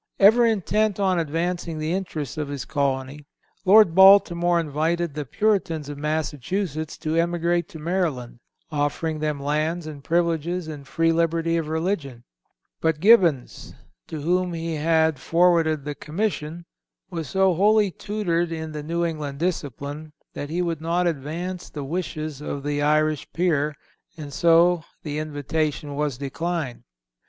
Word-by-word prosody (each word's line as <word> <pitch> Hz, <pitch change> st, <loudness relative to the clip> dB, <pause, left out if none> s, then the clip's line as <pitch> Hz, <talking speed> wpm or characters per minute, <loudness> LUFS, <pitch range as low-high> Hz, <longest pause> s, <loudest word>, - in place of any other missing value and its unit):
Ever 225 Hz, +4 st, +6 dB
intent 215 Hz, -1 st, +1 dB
on 190 Hz, -3 st, +2 dB
advancing 165 Hz, +1 st, -2 dB
the 155 Hz, +1 st, -2 dB
interests 160 Hz, -8 st, -4 dB
of 150 Hz, -2 st, -3 dB
his 140 Hz, -3 st, -5 dB
colony, 140 Hz, 0 st, -2 dB, 0.4 s
Lord 205 Hz, -2 st, +7 dB
Baltimore 175 Hz, -2 st, +6 dB
invited 165 Hz, +1 st, -1 dB
the 150 Hz, 0 st, -4 dB
Puritans 165 Hz, -, 0 dB
of 145 Hz, -, -6 dB
Massachusetts 155 Hz, +2 st, -2 dB
to 155 Hz, +1 st, -2 dB
emigrate 170 Hz, 0 st, +1 dB
to -, -, -10 dB
Maryland, 155 Hz, -8 st, -2 dB, 0.3 s
offering 150 Hz, +2 st, -1 dB
them 150 Hz, -2 st, -2 dB
lands 155 Hz, +4 st, -1 dB
and 150 Hz, -3 st, -8 dB
privileges 170 Hz, +1 st, 0 dB
and 145 Hz, -3 st, -8 dB
free 165 Hz, +2 st, +2 dB
liberty 165 Hz, 0 st, +1 dB
of 165 Hz, -2 st, -1 dB
religion; 160 Hz, -7 st, -2 dB, 0.6 s
but 160 Hz, -2 st, +1 dB
Gibbons, 175 Hz, -, +3 dB, 0.3 s
to 155 Hz, -2 st, -6 dB
whom 180 Hz, +3 st, 0 dB
he 165 Hz, 0 st, -3 dB
had 160 Hz, -1 st, +2 dB
forwarded 165 Hz, -4 st, +2 dB
the 145 Hz, -, -3 dB
commission, 165 Hz, 0 st, -3 dB, 0.5 s
was 165 Hz, -5 st, -4 dB
so 190 Hz, -1 st, +3 dB
wholly 205 Hz, +2 st, +3 dB
tutored 175 Hz, -5 st, -2 dB
in 160 Hz, -1 st, -4 dB
the 150 Hz, -1 st, -5 dB
New 170 Hz, +3 st, -1 dB
England 150 Hz, -4 st, -4 dB
discipline, 150 Hz, -2 st, -4 dB, 0.2 s
that 145 Hz, -, -5 dB
he 175 Hz, +3 st, -1 dB
would 165 Hz, -3 st, -2 dB
not 170 Hz, +2 st, 0 dB
advance 170 Hz, +4 st, -3 dB
the 145 Hz, -, -6 dB
wishes 155 Hz, -2 st, -4 dB
of 140 Hz, -2 st, -5 dB
the 145 Hz, 0 st, -1 dB
Irish 155 Hz, 0 st, +1 dB
Peer, 155 Hz, -4 st, +1 dB, 0.4 s
and 145 Hz, -3 st, -8 dB
so 170 Hz, +2 st, +4 dB, 0.2 s
the 150 Hz, -1 st, -3 dB
invitation 150 Hz, 0 st, -2 dB
was 145 Hz, -3 st, -2 dB
declined." 145 Hz, -1 st, -3 dB
160 Hz, 145 wpm, -24 LUFS, 150-175 Hz, 0.6 s, Lord